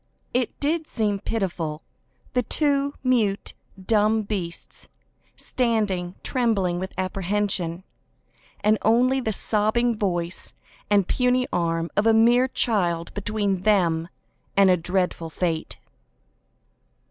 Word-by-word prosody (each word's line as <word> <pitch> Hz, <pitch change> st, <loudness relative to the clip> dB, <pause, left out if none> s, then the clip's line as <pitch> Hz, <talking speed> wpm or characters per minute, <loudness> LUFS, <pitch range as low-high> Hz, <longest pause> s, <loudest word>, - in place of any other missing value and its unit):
It 250 Hz, -1 st, -1 dB
did 310 Hz, +2 st, 0 dB
seem 210 Hz, -3 st, -1 dB
pitiful, 175 Hz, -8 st, -3 dB, 0.5 s
the 250 Hz, -, +2 dB
two 280 Hz, +2 st, +1 dB
mute, 225 Hz, -6 st, +1 dB, 0.3 s
dumb 215 Hz, +2 st, +2 dB
beasts 190 Hz, -5 st, -5 dB, 0.5 s
standing, 205 Hz, -7 st, -1 dB
trembling 200 Hz, -8 st, 0 dB
with 190 Hz, +1 st, -4 dB
apprehension, 185 Hz, -2 st, -1 dB, 0.8 s
and 215 Hz, +1 st, +3 dB
only 250 Hz, +4 st, +3 dB
the 220 Hz, -, -1 dB
sobbing 220 Hz, +3 st, +1 dB
voice 175 Hz, -4 st, -2 dB, 0.3 s
and 200 Hz, -3 st, +3 dB
puny 250 Hz, 0 st, +2 dB
arm 165 Hz, -1 st, 0 dB
of 205 Hz, +2 st, +2 dB
a 225 Hz, -, +5 dB
mere 240 Hz, +3 st, +5 dB
child 175 Hz, -10 st, 0 dB
between 205 Hz, -2 st, -1 dB
them 175 Hz, -5 st, +2 dB, 0.5 s
and 195 Hz, -1 st, +6 dB
a -, -, +5 dB
dreadful 180 Hz, -1 st, -1 dB
fate. 165 Hz, -1 st, -2 dB
205 Hz, 110 wpm, -24 LUFS, 180-230 Hz, 0.8 s, and